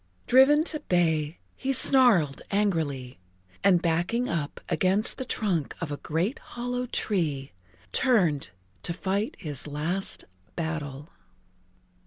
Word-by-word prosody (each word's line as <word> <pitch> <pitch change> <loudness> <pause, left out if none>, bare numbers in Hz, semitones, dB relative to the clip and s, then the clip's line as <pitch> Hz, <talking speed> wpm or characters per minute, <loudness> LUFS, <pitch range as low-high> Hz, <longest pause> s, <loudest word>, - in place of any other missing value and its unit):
Driven 275 +4 +6
to 315 -2 -1
bay, 160 - +1 0.2
he 270 - -2
snarled 240 - +4
angrily, 160 - -1 0.4
and 185 -2 +4
backing 175 +9 +1
up 155 -4 -3
against 195 +4 +1
the 260 - -3
trunk 185 - -1
of 165 -4 -4
a 145 - -3
great 170 - -2
hollow 245 +1 -4
tree, 155 - -1 0.4
turned 175 - +2 0.3
to 170 - -2
fight 195 +4 -1
his 150 -6 -5
last 160 +7 -1 0.3
battle. 155 -3 -4
175 Hz, 115 wpm, -27 LUFS, 150-225 Hz, 0.4 s, Driven